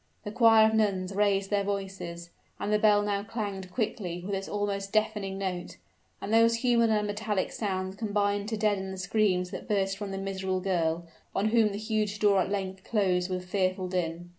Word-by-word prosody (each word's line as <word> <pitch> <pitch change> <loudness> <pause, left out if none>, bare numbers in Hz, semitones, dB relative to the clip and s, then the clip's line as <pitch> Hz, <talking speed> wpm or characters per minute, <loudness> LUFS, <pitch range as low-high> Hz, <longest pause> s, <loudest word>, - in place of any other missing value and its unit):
The 210 - -5
choir 225 -1 +6
of 220 - 0
nuns 200 -3 +1
raised 200 -1 +1
their 200 -1 +2
voices, 190 -4 -5 0.3
and 210 - -1
the 210 - +3
bell 210 -1 +4
now 200 -1 0
clanged 200 -4 -5
quickly 180 -6 -3
with 200 - -3
its 195 0 -3
almost 200 -1 -2
deafening 210 -3 0
note 185 -2 -4 0.4
and 210 - -4
those 230 +1 +5
human 235 -2 +4
and 210 -1 +2
metallic 210 -1 -2
sounds 190 -2 -3
combined 205 -1 0
to 220 - -2
deaden 205 -2 0
the 190 - -6
screams 185 -2 +1
that - - -7
burst 195 -1 0
from 205 -1 -4
the 195 - -4
miserable 190 -1 -2
girl, 170 -3 0 0.3
on 210 +2 +2
whom 220 -2 +3
the 200 - -4
huge 215 -1 -1
door 205 -2 +4
at 185 - -1
length 190 -1 -3
closed 185 -4 +1
with 180 -1 -3
fearful 185 0 0
din. 175 -1 -3
200 Hz, 190 wpm, -28 LUFS, 185-210 Hz, 0.4 s, choir